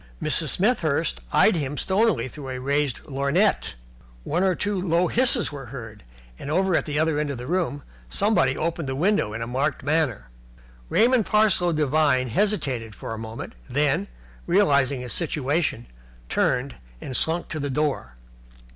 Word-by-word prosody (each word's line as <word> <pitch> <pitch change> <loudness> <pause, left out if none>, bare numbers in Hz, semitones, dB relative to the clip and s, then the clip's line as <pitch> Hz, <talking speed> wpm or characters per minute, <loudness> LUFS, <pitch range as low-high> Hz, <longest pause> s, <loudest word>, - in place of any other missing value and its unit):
Mrs. - - +2
Smethurst 65 -1 +1
eyed 220 - +5
him 145 -2 -2
stonily 210 0 +1
through 135 +1 -9
a 130 -1 -4
raised 140 0 0
lorgnette. 140 - +1 0.5
One 170 +4 -1
or 190 -1 +2
two 205 -1 -1
low 175 0 +2
hisses 240 -4 +2
were 140 -3 -8
heard, 115 -4 -9 0.4
and 140 - -6
over 185 +3 +2
at - - 0
the 150 -1 -2
other 155 -1 +1
end 150 -1 -1
of 140 - -4
the 125 - -7
room 165 -3 -1 0.3
somebody 195 -10 +2
opened 165 -3 -2
the 130 - -2
window 180 - +1
in 115 +1 -4
a - - -3
marked 135 +4 -1
manner. 140 - 0 0.6
Raymond 240 -1 +3
Parsloe 210 -5 +3
Devine 145 -4 +2
hesitated 130 - -1
for 115 - -6
a 110 - -6
moment, 110 0 -7 0.2
then, 140 -5 +1 0.4
realizing 140 -9 +3
his 125 -1 -5
situation, 150 - -1 0.4
turned 135 +2 0 0.2
and 130 - -6
slunk 165 +5 0
to 155 - -3
the 145 0 -2
door. 135 - -2
145 Hz, 160 wpm, -24 LUFS, 130-175 Hz, 0.6 s, eyed